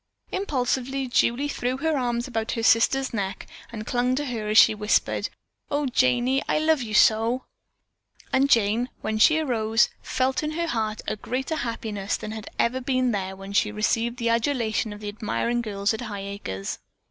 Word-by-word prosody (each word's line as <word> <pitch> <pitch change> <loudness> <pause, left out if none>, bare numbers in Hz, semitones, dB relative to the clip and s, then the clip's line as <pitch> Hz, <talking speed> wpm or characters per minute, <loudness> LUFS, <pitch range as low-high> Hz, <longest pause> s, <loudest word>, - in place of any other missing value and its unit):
Impulsively 270 -6 -1
Julie 245 +3 +2
threw 255 -2 -2
her 320 +2 0
arms 240 -2 -1
about 225 -3 -2
her 230 - -3
sister's 260 +4 +3
neck 195 -3 -3 0.3
and 215 -2 -6
clung 250 +2 +1
to 290 +2 -2
her 230 -5 -4
as 215 - +2
she - - +8
whispered: 210 0 0 0.4
"Oh, 290 0 0
Janey, 255 +1 +2
I - - +2
love 310 -2 +2
you 215 -3 -3
so!" 225 +4 +4 0.9
And 275 +1 +3
Jane, 230 +1 +3
when 215 0 -2
she 315 +8 +6
arose, 225 -7 +2
felt 260 0 0
in 305 0 -3
her 340 +2 -1
heart 220 -8 -2
a 215 - -1
greater 265 +8 -3
happiness 220 -5 -3
than 215 - -6
had 220 -1 -7
ever 255 +3 +1
been 255 -1 +1
there 190 -2 -3
when 195 +1 -9
she 205 +2 +3
had 210 - -9
received 230 +3 0
the 235 -2 0
adulation 230 -2 0
of 205 0 -9
the 210 - -6
admiring 230 +3 -1
girls 205 -2 -1
at 220 - -4
Highacres. 200 - -5
235 Hz, 180 wpm, -25 LUFS, 215-260 Hz, 0.9 s, she